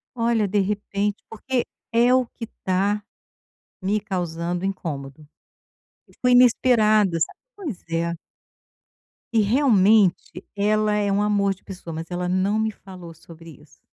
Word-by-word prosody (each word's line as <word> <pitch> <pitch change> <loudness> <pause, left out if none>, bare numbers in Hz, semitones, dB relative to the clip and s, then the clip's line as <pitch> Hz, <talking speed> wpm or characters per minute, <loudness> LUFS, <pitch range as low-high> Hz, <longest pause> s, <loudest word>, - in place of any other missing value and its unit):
Olha, 230 -3 +1
de 205 +2 +1
repente. 205 +1 -2
Porque 245 +3 -2 0.3
é 240 +2 +4
o 255 -1 +3
que 230 - -8 0.2
tá 200 +3 +1 0.8
me 205 +2 0
causando 175 -2 -3
incômodo. 150 -6 -5 1.0
Foi 250 0 +3
inesperado, 220 -5 +4
sabe - - -2 0.2
pois 310 - -6
é. 170 +1 -1 1.2
E 225 - +4
realmente 210 -5 +3
ela 210 +1 +2
é 205 -1 +1
um 200 +1 +1
amor 200 -1 +1
de - - -28
pessoa, 180 -4 -9
mas 165 +2 -7
ela 180 0 -2
não 190 +4 +1
me 220 0 +1
falou 185 -5 -11
sobre 165 +1 -14
isso. - - -23
200 Hz, 135 wpm, -23 LUFS, 180-220 Hz, 1.2 s, é